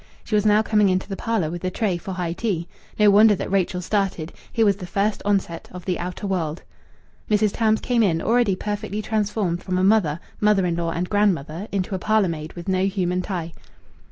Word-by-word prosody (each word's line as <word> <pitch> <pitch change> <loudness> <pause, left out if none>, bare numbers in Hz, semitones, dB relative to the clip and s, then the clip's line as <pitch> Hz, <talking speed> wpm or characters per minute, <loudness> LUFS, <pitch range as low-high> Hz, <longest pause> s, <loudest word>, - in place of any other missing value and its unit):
She - - -8
was 210 0 +3
now 210 +1 +4
coming 210 -2 +3
into 185 0 0
the 195 - -4
parlour 195 -8 -1
with 175 0 -5
the 185 - -1
tray 195 -1 -1
for 190 +3 -6
high 175 -2 -2
tea. 180 -4 -2 0.3
No 210 -1 +6
wonder 210 +1 +6
that 190 - -5
Rachel 185 -2 0
started. 190 -5 -1 0.2
Here 225 -2 +2
was 200 -2 +3
the 180 - -8
first 200 +3 0
onset 195 -5 -1
of 180 -1 -9
the 180 -2 -1
outer 180 +4 -5
world. 175 -4 -2 0.7
Mrs. 210 -1 +3
Tams 220 -1 +2
came 245 -2 +1
in, 175 -7 +2
already 230 -1 +2
perfectly 210 +1 -4
transformed 205 -5 -1
from 185 -1 -2
a 185 - +1
mother, 190 -7 +3 0.2
mother 210 -3 +3
in 170 -1 0
law, 170 -1 -1
and 170 +2 -2
grandmother 190 -3 0
into 195 0 -2
a 190 - -1
parlour 215 -1 +2
maid 155 -1 -5
with 170 -1 -9
no 190 0 +2
human 185 -2 -1
tie. 170 -4 -4
195 Hz, 215 wpm, -23 LUFS, 175-210 Hz, 0.7 s, No